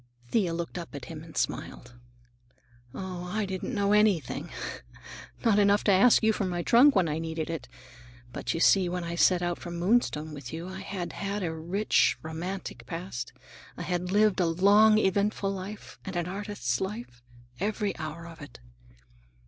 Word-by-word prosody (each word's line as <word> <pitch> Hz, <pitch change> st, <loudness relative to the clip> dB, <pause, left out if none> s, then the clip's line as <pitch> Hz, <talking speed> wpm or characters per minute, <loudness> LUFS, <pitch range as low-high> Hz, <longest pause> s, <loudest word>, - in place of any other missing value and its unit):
Thea 195 Hz, -7 st, +2 dB
looked 170 Hz, +1 st, -4 dB
up 170 Hz, -3 st, -8 dB
at 135 Hz, -3 st, -6 dB
him 160 Hz, -2 st, -8 dB
and 165 Hz, -1 st, -11 dB
smiled. 120 Hz, 0 st, -3 dB, 1.0 s
"Oh, 185 Hz, +1 st, -6 dB
I 210 Hz, +4 st, -1 dB
didn't 190 Hz, +6 st, -4 dB
know 200 Hz, 0 st, +2 dB
anything! 205 Hz, -10 st, +2 dB, 1.0 s
Not 215 Hz, -3 st, +5 dB
enough 205 Hz, 0 st, +4 dB
to 205 Hz, -, +4 dB
ask 200 Hz, +6 st, +6 dB
you 220 Hz, 0 st, +4 dB
for 210 Hz, -, -2 dB
my 175 Hz, -1 st, -2 dB
trunk 255 Hz, +7 st, +6 dB
when 185 Hz, -4 st, +3 dB
I 155 Hz, +1 st, -1 dB
needed 160 Hz, 0 st, -3 dB
it. 165 Hz, -5 st, -5 dB, 0.7 s
But -, -, -3 dB
you -, -, -1 dB
see, 185 Hz, +1 st, +5 dB
when 180 Hz, 0 st, -3 dB
I 170 Hz, 0 st, -4 dB
set 175 Hz, +1 st, +3 dB
out 175 Hz, -1 st, -1 dB
from 175 Hz, -1 st, -6 dB
Moonstone 170 Hz, -5 st, +1 dB
with 140 Hz, -4 st, -8 dB
you, 165 Hz, +2 st, -5 dB
I 190 Hz, +1 st, -7 dB
had 190 Hz, -3 st, -5 dB
had 200 Hz, 0 st, -3 dB
a 165 Hz, -2 st, -2 dB
rich, 175 Hz, +7 st, +2 dB
romantic 160 Hz, -6 st, -6 dB
past. 165 Hz, -7 st, -5 dB, 0.5 s
I 175 Hz, -, -4 dB
had 180 Hz, +1 st, -2 dB
lived 210 Hz, -1 st, +3 dB
a 175 Hz, -, +3 dB
long, 205 Hz, +6 st, +5 dB
eventful 200 Hz, 0 st, +1 dB
life, 195 Hz, +2 st, -7 dB
and 190 Hz, -2 st, -6 dB
an 175 Hz, -1 st, 0 dB
artist's 195 Hz, -, -3 dB
life, 190 Hz, -, -5 dB, 0.4 s
every 210 Hz, +1 st, -1 dB
hour 155 Hz, +1 st, -6 dB
of 165 Hz, -1 st, -11 dB
it. 145 Hz, -4 st, -11 dB
180 Hz, 175 wpm, -28 LUFS, 165-205 Hz, 1.0 s, ask